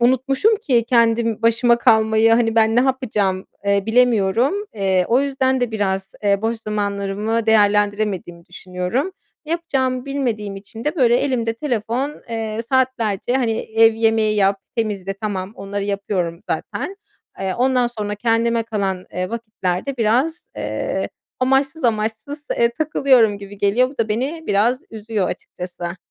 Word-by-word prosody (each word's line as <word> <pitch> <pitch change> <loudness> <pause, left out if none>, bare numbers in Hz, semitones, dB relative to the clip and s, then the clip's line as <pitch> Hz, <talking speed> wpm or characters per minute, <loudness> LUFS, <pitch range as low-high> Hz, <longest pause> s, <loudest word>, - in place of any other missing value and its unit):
unutmuşum 265 - +3
ki 250 - +1
kendim 230 -2 +2
başıma 235 +1 +4
kalmayı 220 0 +4
hani, 225 -1 +3
"Ben 225 0 +3
ne - - +6
yapacağım?" 215 -8 0 0.2
eee, 200 0 +2
bilemiyorum, 235 - +3 0.2
eee, 190 -3 +1
o 245 +3 +4
yüzden 265 -2 0
de 245 -2 0
biraz, 195 -3 -2
eee, 200 0 +2
boş 225 +1 0
zamanlarımı 210 +1 -2
değerlendiremediğimi 205 -4 +1
düşünüyorum. 180 - -3 0.4
Ne 315 - -2
yapacağımı 260 -7 -1
bilmediğim 235 -8 -2
için 220 +3 -10
de 300 +4 -1
böyle 240 -5 +4
elimde 245 -4 0
telefon, 245 +2 -2
eee, 225 -1 -3
saatlerce 245 -5 +1
hani, 240 -4 +1
ev 225 0 +4
yemeği 220 -1 +2
yap, 195 -1 +2 0.2
temizle 200 -4 -2
tamam 195 -2 -4
onları 200 0 -4
yapıyorum 195 -4 -2
zaten, 390 - -3 0.4
eee, 190 -1 -1
ondan 250 0 +2
sonra 210 -3 -4
kendime 230 +1 +1
kalan, 195 -5 -3
eee, 185 0 -3
vakitlerde 220 +1 -3
biraz, 255 +10 0
eee, - - -2 0.3
amaçsız 270 +3 +1
amaçsız, 225 +6 -2
eee, 235 0 +4
takılıyorum 260 -8 +3
gibi 200 0 -11
geliyor. 210 +6 +3
Bu 270 - -16
da 225 - +1
beni 270 +10 -2
biraz 230 +6 +2
üzüyor 215 -3 -2
açıkçası. 175 0 -6
225 Hz, 140 wpm, -20 LUFS, 200-250 Hz, 0.4 s, ne